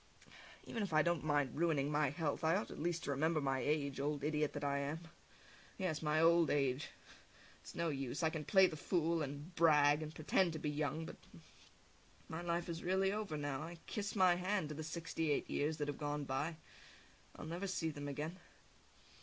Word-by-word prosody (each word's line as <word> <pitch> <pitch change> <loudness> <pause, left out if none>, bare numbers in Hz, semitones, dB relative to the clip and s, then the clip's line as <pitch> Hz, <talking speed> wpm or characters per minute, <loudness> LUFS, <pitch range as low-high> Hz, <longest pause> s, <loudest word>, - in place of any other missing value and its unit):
Even 230 - -4
if 200 -5 -2
I 155 0 +5
don't 170 -2 +1
mind 145 -5 +1
ruining 150 -3 +1
my 150 -1 +2
health, 150 +1 -2
I 160 +2 +4
ought 205 - -2
at - - -8
least 170 +1 -1
to - - -2
remember 155 +3 +2
my 135 -2 0
age, 140 -1 0
old 145 0 -1
idiot 150 0 0
that 145 - -4
I 140 0 +1
am! 145 +4 -3 0.8
Yes, 175 -6 -1
my 155 0 +2
old 165 0 +5
age! 135 0 +1 0.7
It's - - -11
no 170 -1 0
use! 135 +2 -3
I 160 - +3
can 155 -2 -3
play 190 +4 +6
the 170 - -1
fool, 165 +1 +1
and 145 +4 -5
brag, 150 -3 +5
and 155 -1 -5
pretend 160 +3 +1
to - - -3
be 150 -1 -1
young, 155 +2 -1
but - - -8 1.1
my 160 +1 -5
life 170 0 -1
is 170 -1 -4
really 190 +2 +2
over 210 -7 -3
now, 145 -1 -2
I 170 +2 -7
kiss 205 0 -3
my 185 -3 +6
hand 185 -3 0
to - - -4
the 155 +1 -5
sixty 165 0 -3
eight 145 - +1
years 150 +2 0
that 145 -2 -2
have 145 - -4
gone 145 -1 -2
by; 145 +4 -2 0.8
I'll - - -8
never 175 +5 -3
see 165 -4 -1
them 145 -1 -6
again! 150 +6 -4
155 Hz, 205 wpm, -37 LUFS, 145-170 Hz, 1.1 s, play